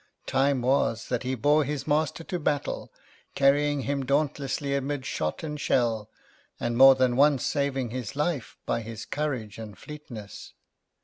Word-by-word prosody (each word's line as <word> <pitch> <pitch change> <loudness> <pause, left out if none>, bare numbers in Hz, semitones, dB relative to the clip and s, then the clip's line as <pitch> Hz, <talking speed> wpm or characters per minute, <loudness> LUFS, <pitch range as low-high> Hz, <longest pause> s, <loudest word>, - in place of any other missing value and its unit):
"Time 135 -1 +1
was 125 -3 +1
that 125 -2 0
he 130 +1 -2
bore 145 +6 +3
his 145 0 -3
master 155 +2 0
to 180 +2 -4
battle, 145 -2 -2 0.4
carrying 145 +1 +3
him 140 0 -1
dauntlessly 140 0 0
amid 140 0 -2
shot 75 - -2
and 150 -2 -4
shell, 110 -3 +1 0.5
and 120 0 -1
more 135 +2 +9
than 130 -1 +2
once 140 -1 +4
saving 135 -4 -1
his 125 0 -5
life 150 -4 -2
by 115 - 0
his 110 0 -7
courage 125 -9 -3
and 105 -4 -8
fleetness. 125 -9 -10
135 Hz, 150 wpm, -27 LUFS, 120-145 Hz, 0.5 s, more